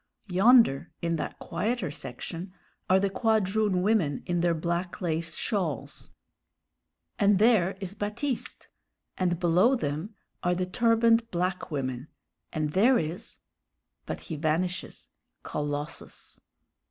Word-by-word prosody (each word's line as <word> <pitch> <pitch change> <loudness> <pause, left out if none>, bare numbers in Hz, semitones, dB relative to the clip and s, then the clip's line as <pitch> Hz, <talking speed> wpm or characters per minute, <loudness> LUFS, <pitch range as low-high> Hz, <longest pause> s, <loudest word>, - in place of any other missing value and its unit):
Yonder 190 - +5
in 170 -1 0
that - - -4
quieter 235 - -2
section 165 +5 -7 0.4
are 190 +1 +6
the 200 - +2
quadroon 210 -2 +1
women 190 -9 +1
in 175 0 0
their 170 -1 +2
black 170 +2 -2
lace 165 -3 -2
shawls 180 -9 -3 1.1
and 200 -1 +5
there 200 -4 +4
is 190 -1 -5
Baptiste; 215 +6 -3 0.5
and 175 -2 0
below 180 +9 +4
them 165 - -3 0.3
are 180 0 +1
the 180 +1 -1
turbaned 230 +3 +3
black 180 0 -2
women, 130 -3 -3 0.4
and 155 -1 -1
there 235 +9 +5
is 165 0 -5 0.7
but - - -4
he 160 - -6
vanishes 170 +4 -2 0.3
Colossus. 145 0 -5
180 Hz, 115 wpm, -28 LUFS, 165-210 Hz, 1.1 s, are